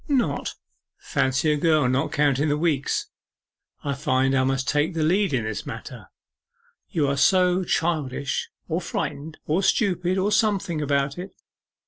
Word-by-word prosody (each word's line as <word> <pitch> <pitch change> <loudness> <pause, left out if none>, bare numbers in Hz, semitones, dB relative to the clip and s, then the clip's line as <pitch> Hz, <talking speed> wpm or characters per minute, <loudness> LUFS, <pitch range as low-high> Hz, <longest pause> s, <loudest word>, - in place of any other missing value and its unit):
'Not? 245 - 0 0.4
Fancy 135 +4 0
a 150 - +1
girl 155 -3 +3
not 130 +2 0
counting 145 0 +2
the 145 - +1
weeks! 150 -4 0 0.8
I 140 - -1
find 135 -2 +1
I 130 -1 +3
must 135 0 0
take 150 +4 +1
the 160 - 0
lead 190 +4 +2
in 130 -4 0
this 110 -1 -4
matter - - -8 0.8
you 150 -4 0
are 140 - +1
so 180 +4 +3
childish, 150 -6 -1 0.2
or 170 +2 -1
frightened, 155 -1 -4
or 160 +5 +1
stupid, 185 -3 +1
or 195 +2 +1
something, 200 -7 +1
about 140 +1 0
it. 185 +2 -8
150 Hz, 150 wpm, -24 LUFS, 140-180 Hz, 0.8 s, girl